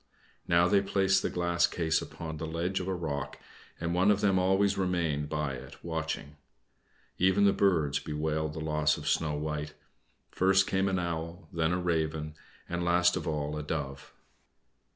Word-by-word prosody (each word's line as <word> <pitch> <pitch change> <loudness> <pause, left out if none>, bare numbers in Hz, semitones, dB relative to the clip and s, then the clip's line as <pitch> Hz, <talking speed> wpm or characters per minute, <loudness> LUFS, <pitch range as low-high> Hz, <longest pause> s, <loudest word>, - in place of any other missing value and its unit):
Now 85 +1 +4
they 100 +1 +4
placed 95 -1 +2
the - - -1
glass 85 -1 +2
case 80 -2 0
upon 80 -1 -7
the 80 +1 -4
ledge 85 +4 -1
on 90 - -5
a 95 - 0
rock, 70 -5 -4 0.4
and 85 +1 -2
one 90 +3 +3
of 105 -1 +4
them 95 -3 +3
always 95 +2 +3
remained 85 -6 0
by 75 -3 -2
it 65 - -9
watching. 80 -3 -4 0.8
Even 95 +2 +4
the 100 - +5
birds 80 -8 +2
bewailed 75 0 -2
the 80 - -6
loss 75 -1 +1
of - - -7
Snow 80 -2 +1
White; 75 0 -4 0.6
first 95 +1 +4
came 95 0 +1
an 95 - 0
owl, 85 0 -4
then 80 0 +1
a 90 - +1
raven, 80 -3 -1 0.3
and 85 0 -2
last 90 0 +3
of 90 - -4
all 75 -1 -2
a 75 - -3
dove. 70 -3 -5
85 Hz, 175 wpm, -30 LUFS, 75-90 Hz, 0.8 s, the